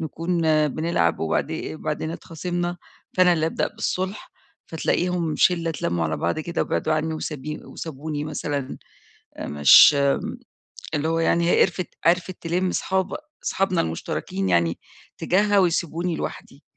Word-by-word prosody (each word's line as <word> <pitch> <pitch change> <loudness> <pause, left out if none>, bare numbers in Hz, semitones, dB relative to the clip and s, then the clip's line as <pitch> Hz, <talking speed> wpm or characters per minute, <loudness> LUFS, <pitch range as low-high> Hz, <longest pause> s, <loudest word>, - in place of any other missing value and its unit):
نكون 165 +2 -3 0.4
بنلعب 150 - 0
وبعدي 80 - -2
وبعدين 155 0 -3
اتخاصمنا، 175 +1 -4 0.4
فأنا 180 -1 +6
اللي 160 -2 +1
أبدأ 165 - -1
بالصُلْح، 190 +3 -4 0.3
فتلاقيهم 170 0 -1
شِلّة 170 -2 +3
اتلَّموا 85 - -1
على 80 0 -1
بعض 85 - -1
كده 170 +2 -2
وبعدوا 155 - -1
عنّي 155 +1 0
وسبي 150 -1 -5
وسابوني 150 -1 -5
مثلًا 145 -2 -4 0.6
آآ - - -5
مش 75 - +8
م 140 -1 +3 0.8
اللي 150 +1 0
هو 165 0 +1
يعني 170 +1 +2
هي - - +4
قرفِت 180 -1 +1 0.2
عرِفِت 180 +2 +2
تِلِم 180 +2 0
صحاب 190 0 -1 0.3
صحابنا 190 -2 +1
المُشترَكين 95 +3 -3
يعني 85 -1 +2 0.4
تجاهها 205 +2 +3
ويسيبوني 170 -1 0
لوحدي. 140 -1 -7
160 Hz, 130 wpm, -23 LUFS, 145-175 Hz, 0.8 s, مش